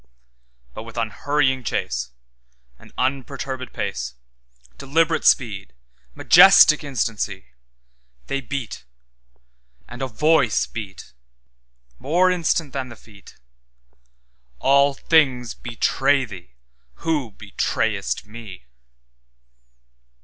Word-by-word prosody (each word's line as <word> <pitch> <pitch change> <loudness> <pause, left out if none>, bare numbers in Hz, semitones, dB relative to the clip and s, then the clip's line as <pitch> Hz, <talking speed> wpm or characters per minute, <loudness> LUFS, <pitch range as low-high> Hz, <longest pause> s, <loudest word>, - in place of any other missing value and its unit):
But - - -7
with 115 +1 -11
unhurrying 130 +4 0
chase, 60 - -3 0.7
And - - -17
unperturbèd 130 0 -3
pace, 60 0 -4 0.6
Deliberate 160 +4 +1
speed, 100 - +2 0.4
majestic 180 -4 +7
instancy, 110 - -3 0.8
They 140 - -3
beat—and 60 - -11
a 135 - -1
Voice 140 0 +2
beatMore 60 - -4
instant 165 -4 -1
than 130 -2 -4
the 115 - -10
Feet—'All - - -4
things 135 -7 +2
betray 135 +3 0
thee, 90 - -12 0.5
who 150 -7 0
betrayest 105 0 -2
Me. 105 - -11
110 Hz, 75 wpm, -22 LUFS, -, 0.8 s, majestic